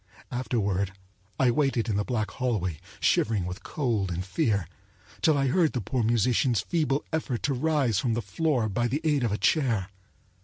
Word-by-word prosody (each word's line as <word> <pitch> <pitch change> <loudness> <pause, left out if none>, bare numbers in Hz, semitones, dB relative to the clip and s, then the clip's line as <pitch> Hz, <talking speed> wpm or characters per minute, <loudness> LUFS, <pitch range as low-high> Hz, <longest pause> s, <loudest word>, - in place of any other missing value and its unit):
Afterward 100 -6 -1 0.5
I 130 -2 +4
waited 135 -3 +1
in 110 - 0
the 105 - +1
black 110 -2 -2
hallway, 105 - -1 0.2
shivering 105 -5 +2
with 90 +1 -6
cold 115 -10 -1
and 90 +2 -3
fear, 100 - 0 0.5
till 155 -2 +4
I 135 - +2
heard 160 +4 +2
the 125 - -1
poor 125 +5 -1
musician's 115 +1 +2
feeble 150 +1 0
effort 140 -7 -2
to 145 - +1
rise 135 -6 +1
from 115 -2 0
the 120 - -1
floor 125 - 0
by 120 +4 0
the 140 +6 -2
aid 150 -4 +2
of 115 - +1
a 105 - 0
chair. 115 - +1
120 Hz, 180 wpm, -27 LUFS, 105-135 Hz, 0.5 s, I